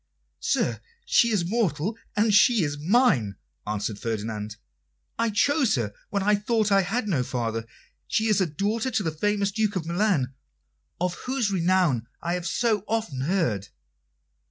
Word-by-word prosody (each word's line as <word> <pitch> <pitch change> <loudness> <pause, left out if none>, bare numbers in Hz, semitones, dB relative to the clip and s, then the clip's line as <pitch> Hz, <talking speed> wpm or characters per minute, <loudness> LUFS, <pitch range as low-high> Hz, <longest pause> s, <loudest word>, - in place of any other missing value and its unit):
"Sir, - - 0 0.2
she 235 - +4
is 205 -6 +1
mortal, 200 -2 0 0.2
and 210 0 +3
she 215 0 +5
is 145 -1 -2
mine," 160 - +3 0.3
answered 105 0 -3
Ferdinand. 110 -1 -4 0.6
"I 230 0 +2
chose 255 - +2
her 110 -5 -2 0.2
when 200 -2 -1
I 210 +1 +3
thought 210 0 +1
I 195 0 +5
had 215 +5 -2
no 160 -10 +1
father. 115 -2 -3 0.4
She 220 - +1
is 215 -2 +3
daughter 200 - 0
to 220 -4 -1
the 160 - -1
famous 200 +5 0
Duke 215 -1 0
of 175 -4 -2
Milan, 170 -7 +1 0.7
of 180 0 0 0.2
whose 255 -6 0
renown 175 - +2
I 170 - -2
have 180 -1 -2
so 215 +1 +1
often 215 -12 -2
heard." 135 - 0
190 Hz, 155 wpm, -25 LUFS, 140-215 Hz, 0.7 s, she